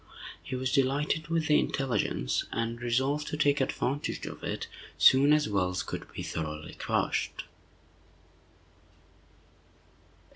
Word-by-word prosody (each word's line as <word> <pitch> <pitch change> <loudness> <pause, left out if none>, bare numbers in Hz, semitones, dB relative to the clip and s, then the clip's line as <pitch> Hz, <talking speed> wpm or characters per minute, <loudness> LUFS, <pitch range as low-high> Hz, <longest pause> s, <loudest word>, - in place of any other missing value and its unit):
He 130 - -5
was 130 0 -1
delighted 140 +4 +1
with 165 -1 0
the 150 -1 +5
intelligence, 115 - 0
and 115 +1 -2
resolved 130 +5 0
to 150 - -3
take 145 -1 +3
advantage 135 +1 -2
of - - -8
it - - -3 0.3
soon 140 +2 +6
as 150 0 +4
Wells 90 -3 0
could - - -6
be - - -6
thoroughly 75 -1 -5
crushed. - - -1
135 Hz, 115 wpm, -29 LUFS, 115-150 Hz, 0.3 s, soon